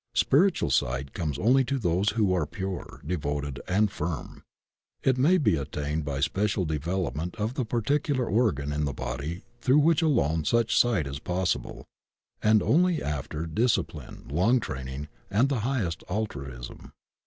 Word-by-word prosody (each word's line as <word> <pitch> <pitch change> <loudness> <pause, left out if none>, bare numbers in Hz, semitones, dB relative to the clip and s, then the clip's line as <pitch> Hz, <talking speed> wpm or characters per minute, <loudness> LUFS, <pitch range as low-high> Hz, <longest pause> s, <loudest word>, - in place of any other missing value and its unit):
Spiritual 170 - +3
si^t 65 +2 0
comes 75 -6 -2
only 130 - +4
to 135 +2 -1
those 95 -2 +1
who 105 -5 +2
are 85 -5 0
pure, 95 -1 -6
devoted, 70 -4 -3
and 100 +2 +2
firm. 80 -4 -5 0.6
It 130 - +3
may 165 +8 +5
be 110 - +2
attained 75 +2 -3
by 70 -2 -3
special 100 +4 +1
de 75 -1 -1
velopment 85 +1 -2
of 110 +2 -2
the 130 -2 -2
particular 130 +4 0
organ 100 - +1
in 75 0 0
the 70 - -2
body 70 +8 -4 0.2
throu^ 130 +5 +4
which 160 +2 +4
alone 80 - +2
such 115 +5 +2
sight 110 -10 +3
is 70 0 -5
possible, 90 +2 -2 0.6
and 110 0 +4
only 175 +2 +3
after 75 +2 -3
disci 110 +9 +2
pline, - - -11
long 95 - +3
training, 65 - -5 0.2
and 115 +7 +3
the 135 -4 0
highest 110 - -1
altruism. 70 - -5
90 Hz, 155 wpm, -27 LUFS, 75-120 Hz, 0.6 s, may